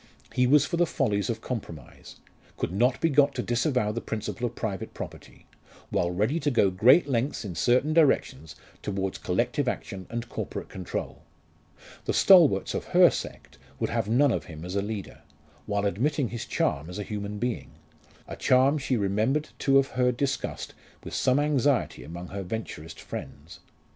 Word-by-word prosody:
He 125 0 +3
was 145 +2 +5
for 170 - -2
the 175 0 +3
follies 105 - 0
of 115 - -2
compromise 85 - -7 0.4
could - - -2
not 120 +7 +2
be - - +2
got 140 -2 +3
to 125 - -2
disavow 120 -2 +1
the 115 +2 -4
principle 110 +3 -3
of 120 - -9
private 100 -5 -4
property, - - -9 0.5
while 85 - +1
ready 105 - 0
to 150 - 0
go 105 -7 +3
great 125 - +5
lengths 130 -1 -1
in 95 - -5
certain 130 - +2
directions 135 - +2 0.3
towards 95 -1 -3
collective - - 0
action 95 -1 -4
and 120 +1 -4
corporate - - -5
control. 95 -2 -5 0.8
The - - 0
"stalwarts" 165 - +6
of - - -3
her - - +8
sect - - -7 0.2
would - - -1
have 100 - -1
none 130 +4 +4
of - - -2
him 80 -2 -9
as 90 +2 -5
a 100 - +1
leader, 105 -1 -6 0.5
while 105 -1 0
admitting 130 - 0
his 120 -2 -6
charm 70 +4 -1
as 90 - -7
a 105 - -3
human 105 0 -5
being 120 +1 -3 0.6
a - - -6
charm 135 +4 +3
she 130 -2 0
remembered 110 +9 0
to 135 - +2
have 135 0 +4
heard 125 -1 +1
discussed 140 0 -3 0.3
with - - -8
some 130 +2 +2
anxiety 145 -2 +1
among 85 +2 -8
her 100 0 -5
Venturist 85 -5 -6
friends. 75 +4 -8
115 Hz, 175 wpm, -27 LUFS, 100-135 Hz, 0.8 s, her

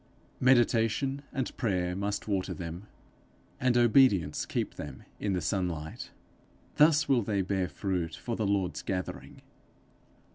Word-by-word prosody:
Meditation 125 +2 +3
and 130 - -3
prayer 90 -6 0
must 100 +2 -3
water 95 -3 -1
them, 85 +3 -7 0.7
and 125 -1 +2
obedience 120 - +4
keep - - -2
them 75 -3 -8 0.2
in 100 -2 -1
the 90 - -1
sunlight. 85 -3 -3 0.7
Thus 150 0 +5
will 130 -3 +3
they 100 -2 0
bear 95 -1 -1
fruit 90 -5 -2
for 120 - -4
the 110 -2 -1
Lord's 100 -3 0
gathering. 90 -1 -5
100 Hz, 130 wpm, -29 LUFS, 90-120 Hz, 0.7 s, Thus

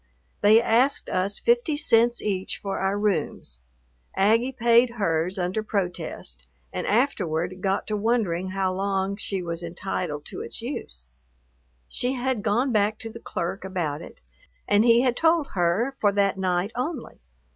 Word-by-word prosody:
They 215 +2 +7
asked 240 +4 +2
us 195 +3 0
fifty 470 -11 +2
cents 240 -5 +3
each 190 -2 -1
for 195 -1 -4
our 195 +1 0
rooms. 180 - -2 0.6
Aggie 225 +6 +3
paid 235 -1 +4
hers 170 -2 0
under 185 +4 -1
protest 180 - -4 0.3
and - - -3
afterward 185 - 0
got 195 0 0
to 215 - -2
wondering 205 -5 0
how 190 0 -1
long 195 0 -1
she 195 -3 -3
was 170 0 -3
entitled 170 -3 -4
to - - -7
its - - -5
use. - - -6 0.8
She 250 - -1
had 255 -3 -1
gone 235 +5 +1
back 210 -1 +2
to 225 -2 -6
the 230 - -9
clerk 180 -2 -4
about 170 -6 -3
it, - - -12 0.5
and 205 +1 +4
he 235 0 +5
had 250 -2 +2
told 325 -1 +2
her 195 +9 +1
for 205 - +3
that 200 -1 +2
night 185 +1 0
only. 260 +2 -4
200 Hz, 155 wpm, -25 LUFS, 185-235 Hz, 0.8 s, They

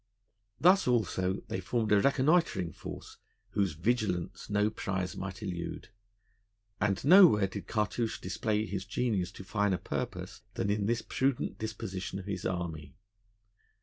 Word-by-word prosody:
Thus, 185 0 +5
also, 100 -6 +1
they - - -3
formed 110 +4 -1
a 105 -1 +6
reconnoitring 140 - +2
force, - - -9 0.3
whose 100 -5 +1
vigilance 95 +1 -1
no 105 +1 +2
prize 95 -4 -3
might 95 -1 -6
elude; 85 -2 -5 0.9
and 105 +3 0
nowhere 165 - +8
did 95 +1 -6
Cartouche 110 +1 -1
display 110 -1 -1
his 95 -1 -4
genius 105 -2 -1
to - - -9
finer 100 -1 +1
purpose - - -5
than 100 - 0
in 105 -1 0
this 120 +1 0
prudent 135 -1 -1
disposition 95 -4 -4
of 95 - -7
his 100 -3 -3
army. 80 -6 -4
100 Hz, 135 wpm, -31 LUFS, 95-115 Hz, 0.9 s, nowhere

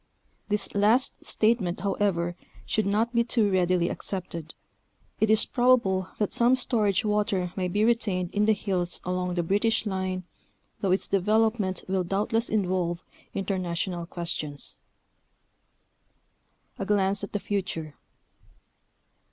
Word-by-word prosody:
This 210 0 0
last 215 +6 +2
statement, 215 -5 +1
however, 190 -3 0 0.3
should 215 -2 0
not 220 +4 +1
be 235 0 +3
too 225 -3 +2
readily 180 -2 +2
accepted. 175 -5 -4 0.6
It 220 - +2
is 220 0 +5
probable 235 -7 +2
that 210 - 0
some 245 0 +4
storage 215 -6 +1
water 205 -4 0
may 185 -2 -1
be 205 +4 +1
retained 200 -6 +1
in 210 +1 +1
the 220 - +6
hills 185 -4 -2
along 180 0 -2
the 175 - 0
British 220 +6 +1
line, 185 -2 -2 0.6
though 200 -3 -1
its 190 - +2
develop 220 +4 +2
ment 185 -3 -2
will 190 -1 0
doubtless 210 +6 0
involve 180 -4 0 0.3
international 180 -2 -2
questions. 155 -5 -2 2.0
A 195 - -2
GLANCE 200 -1 +2
AT 200 - -6
THE 205 - 0
FUTURE. 175 -7 -3
195 Hz, 125 wpm, -27 LUFS, 180-215 Hz, 2.0 s, the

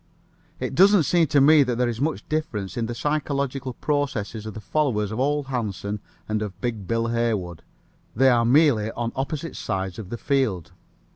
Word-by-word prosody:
It - - -3
doesn't 195 +3 +6
seem 170 +2 +3
to 145 - +3
me 150 +2 +7
that 125 -3 +1
there 125 0 +2
is 120 0 -3
much 155 +2 -2
difference 135 -11 -3
in 115 -2 -1
the 120 - -4
psychological 140 -2 -2
processes 115 -7 -2
of 110 - -7
the - - -5
followers 105 -2 0
of 110 - -4
Ole 145 +2 +1
Hansen 105 -6 -3 0.3
and 110 0 -1
of 100 -3 -5
Big 110 -4 -3
Bill 115 +1 0
Haywood. 105 -8 -1 0.5
They 130 +4 +5
are 120 -2 +4
merely 120 -4 +4
on 115 0 -3
opposite 150 +4 -3
sides 95 -3 -3
of 100 -4 -7
the 120 - -4
field. 115 - 0
120 Hz, 185 wpm, -24 LUFS, 105-145 Hz, 0.5 s, me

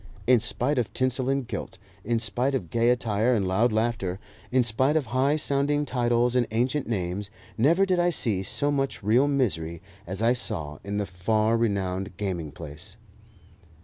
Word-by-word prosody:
In 125 -1 +5
spite 125 +6 0
of 120 - -2
tinsel 130 0 0
and 135 -3 0
gilt, 100 -4 -6 0.3
in 115 +2 0
spite 120 +5 0
of 90 -11 -4
gay 115 0 +3
attire 120 0 +2
and 100 -4 0
loud 110 +6 +2
laughter, 110 -4 -1 0.3
in 130 0 +4
spite 130 +6 +2
of 155 -4 +1
high 135 +3 +3
sounding 145 0 0
titles 120 -1 +1
and 125 -2 +2
ancient 125 +6 0
names, 100 -2 -2 0.3
never 165 - +4
did 185 -2 +1
I 175 0 +3
see 110 - 0
so 145 +9 -1
much 135 -5 -2
real 120 +7 +4
misery 85 - 0 0.3
as 95 +4 -4
I 120 +2 +5
saw 80 -12 -2
in 100 +1 -3
the 105 - 0
far 105 +4 +1
renowned 95 -4 -1
gaming 90 -7 -3
palace. 85 +7 -9
115 Hz, 175 wpm, -26 LUFS, 100-130 Hz, 0.3 s, In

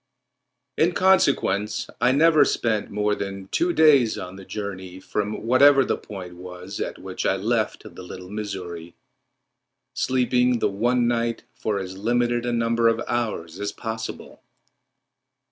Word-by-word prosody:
In 170 +2 +3
consequence 140 - +2
I 125 +1 +4
never 155 +3 +5
spent 110 -3 0
more 105 0 0
than 100 -1 -5
two 175 +1 +1
days 145 -9 +5
on 90 -2 -7
the 95 -1 -11
journey 95 -3 -6
from 105 +2 -3
whatever 135 +3 +6
the - - 0
point 90 -3 -9
was 90 +2 -8
at - - -3
which - - -6
I - - +2
left - - -1
the - - -11
Little 90 +1 -9
Missouri, 90 -5 -6 1.0
sleeping 125 -1 +2
the 115 - 0
one 120 +4 +1
night 115 -1 -1
for 105 -2 -2
as 95 0 -6
limited 120 +2 0
a - - 0
number 115 0 +2
of 115 0 +2
hours 105 -8 -3
as 100 0 -2
possible. 110 -1 -6
110 Hz, 145 wpm, -24 LUFS, 95-120 Hz, 1.0 s, whatever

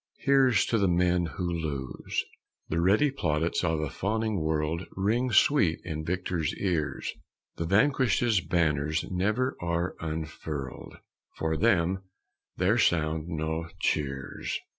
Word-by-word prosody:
Here's 135 -3 +4
to 115 - +1
the 100 - +3
men 90 0 +2
who 90 +2 -4
lose! 75 -6 -3 0.4
The 85 +1 0
ready 105 +11 +4
plaudits 85 - 0
of 80 -1 +1
a 75 - -2
fawning 110 0 -1
world 80 +2 -1
Ring 115 +6 +1
sweet 105 - +4
in 80 -2 -4
victor's 85 -1 -2
ears; 85 -6 -1 0.4
The 85 - -2
vanquished's 120 - +3
banners 80 -3 0
never 105 +8 0
are 85 +1 -1
unfurled 80 -4 -5 0.4
For 80 0 0
them 95 -2 +2 0.6
there 100 +6 +3
sound 80 -4 +1
no 80 0 -3
cheers. 70 -3 -2
85 Hz, 120 wpm, -28 LUFS, 80-100 Hz, 0.6 s, Here's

